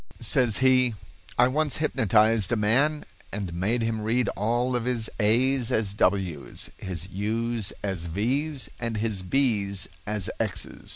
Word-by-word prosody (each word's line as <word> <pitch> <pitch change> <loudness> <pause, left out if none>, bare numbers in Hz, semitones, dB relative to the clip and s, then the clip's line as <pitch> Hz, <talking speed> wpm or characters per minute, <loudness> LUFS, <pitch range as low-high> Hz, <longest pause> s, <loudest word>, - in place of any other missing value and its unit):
Says 120 -5 +2
he: 130 -3 +4 0.4
"I 120 - +6
once 150 +2 0
hypnotized 110 - +3
a - - +3
man 135 +9 +1 0.3
and 95 -4 -4
made 105 +7 0
him 115 -1 -1
read 115 +3 +1
all 120 +4 0
of 120 -1 -1
his 120 -3 -1
a's 120 +3 +3
as 105 -3 +1
w's, 95 -7 0
his 90 -3 -5
u's 110 +2 0
as 95 -4 -2
v's, 130 - -1
and 115 -2 -3
his 105 -3 -1
b's 100 -3 0 0.2
as 105 -3 -1
x's. - - -4
110 Hz, 140 wpm, -26 LUFS, 100-125 Hz, 0.4 s, I